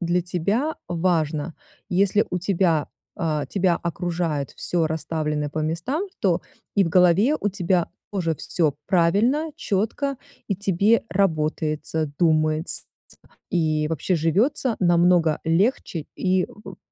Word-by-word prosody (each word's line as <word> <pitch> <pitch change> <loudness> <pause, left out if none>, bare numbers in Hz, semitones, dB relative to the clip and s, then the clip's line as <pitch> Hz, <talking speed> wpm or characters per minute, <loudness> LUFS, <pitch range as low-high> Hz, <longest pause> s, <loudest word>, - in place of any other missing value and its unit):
для 175 0 +1
тебя 200 - -1
важно: 165 -3 0 0.4
если 200 +3 +3
у 180 - -1
тебя 175 -4 +1 0.3
а, 155 -6 -1
тебя 180 +1 +1
окружает 170 -4 -2
всё 170 -2 -1
расставленное 155 -2 -2
по 155 - -4
местам, 170 - -2
то - - +2 0.3
и 200 - +4
в - - -1
голове 180 - +4
у 205 - 0
тебя 180 -2 0 0.2
тоже 165 -5 -1
все 155 -1 0
правильно, 215 - +2
четко, 225 +8 -1 0.3
и 200 - +1
тебе 200 +3 +2
работается, 155 -3 0
думаетс 155 -1 +2 0.7
и 155 -3 +1
вообще 165 +3 -1
живется 220 - +1
намного 175 -3 +4
легче, 170 - 0
и 185 0 +1
в, 210 - -12
175 Hz, 120 wpm, -23 LUFS, 160-195 Hz, 0.7 s, и